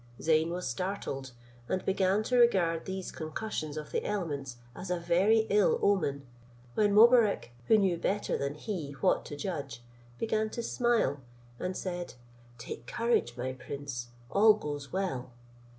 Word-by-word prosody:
Zeyn 160 +1 +3
was 180 +1 -3
startled, 180 -8 -3 0.4
and 185 - -1
began 190 +2 +2
to 250 - 0
regard 185 -9 +3
these 190 -1 -4
concussions 155 -1 -4
of 150 -1 -6
the - - -1
elements 145 -11 -3 0.2
as 185 - -7
a 180 -1 0
very 190 +6 +3
ill 205 0 +4
omen, 145 -9 +1 0.5
when 205 - +3
Mobarec, 220 - +5 0.2
who 220 - +6
knew 190 -4 +2
better 200 +4 -1
than 140 +1 -2
he 155 -4 -5
what 135 - +1
to 145 - -6
judge, 140 -8 -5 0.3
began 220 -1 0
to 235 - -5
smile, 235 - +1 0.4
and 185 0 -3
said, 175 -5 -4 0.4
"Take 115 0 -8
courage, 230 - 0
my 130 +1 -3
prince, 130 -1 -6 0.2
all 215 +1 +6
goes 145 -7 -6
well." 175 -10 -2
180 Hz, 150 wpm, -30 LUFS, 145-205 Hz, 0.5 s, who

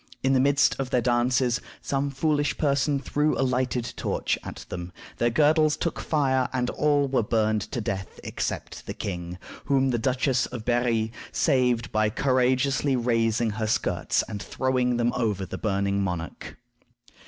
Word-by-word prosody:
In 135 0 +3
the 130 - +4
midst 140 +2 +3
of 135 -2 -2
their 125 - +2
dances, 120 0 +2 0.2
some 140 0 -1
foolish 145 +1 0
person 140 -1 +1
threw 150 +2 0
a 135 - +3
lighted 125 -1 -1
torch - - -1
at - - -8
them. 90 0 -6 0.3
Their 120 - +2
girdles 155 +4 +3
took 170 - -2
fire, 130 -4 +1
and 125 -1 -1
all 145 -2 +2
were 130 -2 +1
burned 110 -1 +1
to - - -2
death 95 -2 -4
except - - -4
the - - -5
king, 90 -2 -5 0.3
whom 135 -1 +2
the 120 - 0
Duchess 130 0 +1
of 120 -3 -7
Berri 120 -2 +1 0.2
saved 125 -3 +1
by 110 0 +2
courageously 130 +3 +2
raising 115 -2 +1
her 110 +1 -2
skirts 110 - 0
and 105 -2 -6
throwing 125 0 0
them 120 0 +1
over 105 -5 -1
the - - -7
burning 100 -1 0
monarch. 90 -4 -4
125 Hz, 160 wpm, -26 LUFS, 110-135 Hz, 0.3 s, the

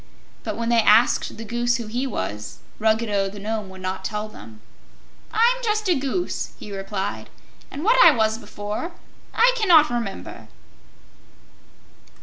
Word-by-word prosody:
But - - -4
when 230 0 -2
they 235 -1 +4
asked 220 +3 +3
the 225 - -7
Goose 240 +2 0
who 235 - -6
he 245 +5 -2
was, 105 - -5 0.2
Ruggedo 220 -3 +1
the 205 - -11
Nome 210 0 -4
would 190 0 -11
not 185 +1 -4
tell 210 +2 -3
them. 110 - -13 0.7
"I'm 470 +2 +3
just 430 -2 0
a 360 - +4
Goose," 280 +5 -2
he 205 -1 -8
replied, 195 0 -4 0.4
"and 285 - -6
what 480 +5 +6
I - - +10
was 220 -5 +1
before, 210 - -5 0.4
I 485 +2 +4
cannot 345 - +5
remember." 230 -5 -5
225 Hz, 145 wpm, -23 LUFS, 205-295 Hz, 0.7 s, I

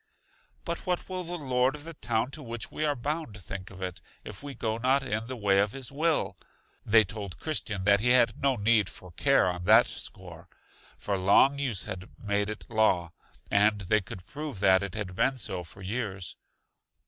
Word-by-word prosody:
But 170 0 -4
what 180 -1 0
will 185 -1 -4
the 175 +1 -4
Lord 130 -2 +1
of 145 - -7
the 165 +1 -6
town 120 -3 -1
to 155 - -7
which 120 -3 -5
we 155 - -1
are 145 -1 +1
bound 145 -4 -4
think 95 +1 -7
of 95 -1 -9
it, 90 0 -5 0.2
if 105 - -9
we 140 -1 -7
go 110 -1 -2
not 130 +3 +2
in 115 -3 -2
the 130 - -5
way 100 -4 +3
of 100 +1 +1
his 135 -2 -4
will? 155 +3 0 0.5
They 110 +1 +6
told 100 -2 -6
Christian 110 -11 -2
that 100 0 +5
he 120 +4 +2
had 125 -1 +4
no 135 -1 +3
need 105 -2 +3
for 90 - -11
care 85 - +3
on 90 -1 -3
that 110 +3 +7
score, - - -5 0.5
for 100 -2 -2
long 135 +9 +5
use 120 -9 0
had 95 0 -6
made 105 -1 -1
it 110 - -6
law, 95 -7 +2 0.4
and 105 0 +4
they 105 +3 +2
could 90 -1 -9
prove 145 +1 -6
that 95 -1 +5
it 100 -1 -5
had 100 -4 -4
been 135 +7 +2
so 95 -7 -4
for 95 +4 -13
years. 100 -3 -3
110 Hz, 200 wpm, -28 LUFS, 95-135 Hz, 0.5 s, that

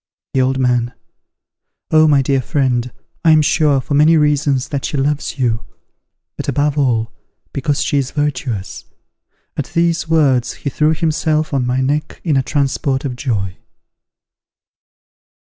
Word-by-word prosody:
The 130 - +2
Old 130 +1 +1
Man. 125 -2 +1 1.0
Oh, 155 0 +5
my 140 -3 +4
dear 135 0 +1
friend! 125 -4 0 0.3
I 165 - +4
am 155 -1 +5
sure, 145 -2 +2
for 130 - -4
many 155 +3 +5
reasons, 145 -2 +1
that 140 -2 -3
she 145 - -3
loves 145 +2 -1
you; 115 -3 0 0.7
but - - -5
above 145 0 +1
all, 120 -6 +1 0.4
because 140 +1 -1
she 145 - +1
is 135 -2 -2
virtuous. 135 -9 -3 0.7
At 145 - -2
these 170 -1 +1
words 140 -7 +2
he 140 - 0
threw 155 +3 +2
himself 155 -1 0
on 130 -3 0
my 125 +1 0
neck 145 +3 -2
in 155 -5 +1
a 135 - +3
transport 135 0 -1
of 130 -3 -3
joy. 100 -8 -3
140 Hz, 145 wpm, -17 LUFS, 130-150 Hz, 1.0 s, Oh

